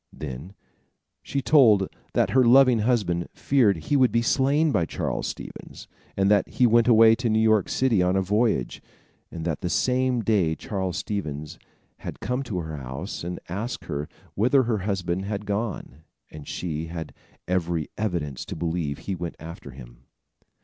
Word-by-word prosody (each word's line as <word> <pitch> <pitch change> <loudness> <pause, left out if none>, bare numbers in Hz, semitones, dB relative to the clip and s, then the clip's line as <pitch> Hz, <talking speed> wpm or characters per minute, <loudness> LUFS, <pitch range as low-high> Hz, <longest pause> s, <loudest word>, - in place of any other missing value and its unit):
Then 75 +6 -8 0.7
she 140 -1 -3
told 115 -7 +5 0.3
that - - +2
her 130 0 +5
loving 125 0 +6
husband 105 -7 0
feared 120 -9 +2
he 80 - -2
would 130 -3 +4
be 115 0 +1
slain 145 +5 +2
by 95 -9 +2
Charles - - -3
Stevens, - - -9 0.3
and 95 0 +3
that 105 -1 +3
he 125 - +2
went 115 0 +4
away 115 -1 +7
to 120 +1 -1
New 110 - +2
York 110 -3 +3
city 120 -7 +2
on 90 +1 +2
a 95 - +2
voyage, 105 - 0 0.5
and 80 -2 -7
that 80 -4 -2
the 90 - -2
same 125 +3 +1
day 100 -8 +1
Charles 95 -2 -3
Stevens 75 -9 -4 0.4
had - - -7
come 125 +2 -2
to 115 -8 -4
her 80 -2 -6
house, 65 +3 -6
and 90 +1 -5
had 85 - -6
asked 120 +4 -5
her 75 +1 -4 0.2
whither 125 +6 +3
her 115 -3 0
husband 95 -2 -2
had 105 0 -4
gone, 100 - -4 0.3
and 75 -2 -10
she 80 -2 -4
had 80 -1 -7 0.3
every 85 -4 -1
evidence 85 -11 -3
to - - -6
believe 80 -3 -2
he 100 - -5
went 85 -2 -5
after 80 -2 -9
him. 60 -2 -13
100 Hz, 170 wpm, -25 LUFS, 80-115 Hz, 0.7 s, away